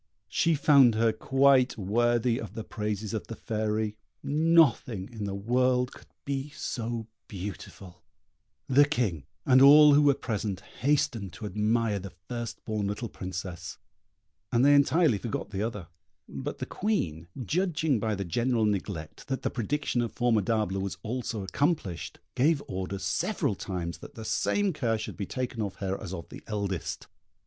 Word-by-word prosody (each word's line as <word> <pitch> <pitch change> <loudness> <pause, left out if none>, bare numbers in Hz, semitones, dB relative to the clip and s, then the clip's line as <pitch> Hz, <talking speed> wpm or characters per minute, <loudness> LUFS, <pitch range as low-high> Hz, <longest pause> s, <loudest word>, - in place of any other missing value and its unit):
She 165 - +2
found 140 -5 +6
her 115 0 +3
quite 135 +1 +3
worthy 120 +4 +1
of 110 -2 -8
the 110 - -4
praises 105 0 -3
of 110 - -3
the 115 - -6
Fairy; 110 -1 -2 0.3
nothing 150 - +3
in 110 -3 -4
the 100 -1 -3
world 125 +4 +1
could - - -15 0.2
be 140 0 -2
so 115 -4 -3 0.2
beautiful; 95 -2 -8 0.7
the 140 +2 +6
King 110 - -1 0.2
and 130 0 +6
all 150 +2 +9
who 145 - +6
were 145 -2 +5
present 105 -7 -3 0.2
hastened 120 - +1
to 85 - -8
admire 105 0 +1
the 100 +1 -7 0.2
first 120 -1 -5
born 110 -3 -1
little 105 +3 -3
Princess, 90 -1 -6 0.7
and 120 +2 +4
they 145 - +7
entirely 145 - +4
forgot 115 -2 -4
the 100 -1 -3
other; 105 -5 -3 0.4
but - - -5
the - - -4
Queen, 85 - -2 0.2
judging 160 - +1
by 110 0 -1
the 100 0 -4
general 115 +6 +1
neglect, 95 -6 -3
that 135 0 -3
the - - 0
prediction 125 +1 -1
of 115 - -2
Formidable 110 -4 +1
was 95 -1 -4
also 115 -2 -3
accomplished, 100 - -1 0.2
gave 145 +3 +2
orders 95 +1 -4
several - - 0
times 85 -3 -4
that - - -12
the 110 - -7
same 205 - +1
care 120 -7 0
should 110 - -6
be 100 - -4
taken 125 -3 -3
of 100 -3 -3
her 95 -1 -2
as 100 -5 -6
of 85 -5 -6
the - - -10
eldest. 100 -5 -3
115 Hz, 160 wpm, -28 LUFS, 100-130 Hz, 0.7 s, all